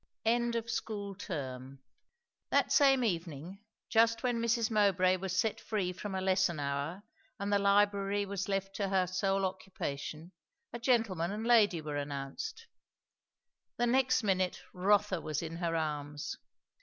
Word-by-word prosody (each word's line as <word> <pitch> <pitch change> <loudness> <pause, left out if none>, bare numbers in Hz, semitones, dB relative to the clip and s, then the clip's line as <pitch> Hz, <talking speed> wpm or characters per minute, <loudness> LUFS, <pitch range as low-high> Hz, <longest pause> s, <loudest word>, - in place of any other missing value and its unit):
END 235 +1 +2
OF 230 0 -2
SCHOOL 210 -4 -3
TERM. 135 -7 -6 0.7
That - - +2
same 270 -3 +5
evening, 170 -2 -3 0.3
just 230 +1 +3
when 245 -2 0
Mrs. 230 -1 +1
Mowbray 190 -3 +3
was 185 0 -3
set 220 +2 0
free 190 -5 -1
from 195 +1 -5
a 190 - -1
lesson 185 -3 +2
hour, 145 +7 -3 0.4
and 200 +1 -1
the 200 - +4
library 200 0 +2
was 200 0 -4
left 195 0 -2
to 200 -2 -1
her 190 -1 +2
sole 195 +2 0
occupation, 170 -4 -5 0.4
a 240 - -4
gentleman 225 -9 +1
and 215 +2 -4
lady 210 -8 +4
were 150 -1 -4
announced. 145 - -5 1.1
The 240 - +2
next 255 0 +3
minute 185 -3 0
Rotha 190 -1 +2
was 155 +1 -3
in 165 0 -5
her 170 -1 -1
arms. 150 -2 -3
195 Hz, 145 wpm, -32 LUFS, 170-220 Hz, 1.1 s, same